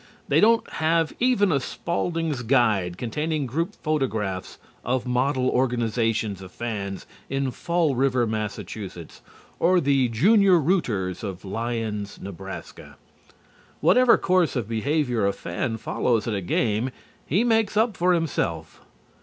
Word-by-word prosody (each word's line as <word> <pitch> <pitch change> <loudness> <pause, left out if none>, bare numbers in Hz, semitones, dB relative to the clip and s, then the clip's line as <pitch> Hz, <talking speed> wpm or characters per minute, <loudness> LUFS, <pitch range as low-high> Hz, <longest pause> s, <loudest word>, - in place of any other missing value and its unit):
They - - +4
don't 230 +1 +4
have 160 0 +1
even 235 -6 +3
a 140 - +2
Spalding's 165 0 -2
Guide 110 -8 +2
containing 150 +6 -2
group 165 - -2
photographs 110 - -2 0.3
of 125 +1 -1
model 130 +1 +1
organizations 115 -5 0
of 95 -1 -10
fans 100 -4 -5 0.2
in 135 -1 -1
Fall 170 +2 0
River, 130 -1 +2
Mass., 110 -1 -3 1.0
or 180 +2 +4
the 140 -4 +2
Junior 195 - +5
Rooters 115 - 0
of 95 -2 -6
Lyons, 110 -1 -3
Nebraska. 95 0 -9 0.8
Whatever 250 -1 +5
course 185 -4 +2
of 120 -5 -2
behavior 120 -1 0
a 100 - +1
fan 110 +6 -3
follows 115 +1 0
at 115 - -1
a 100 - -2
game 110 +6 0 0.4
he 190 - +2
makes 225 -3 +2
up 220 -1 +2
for 180 0 +2
himself. 85 - -2
125 Hz, 130 wpm, -24 LUFS, 110-165 Hz, 1.0 s, Junior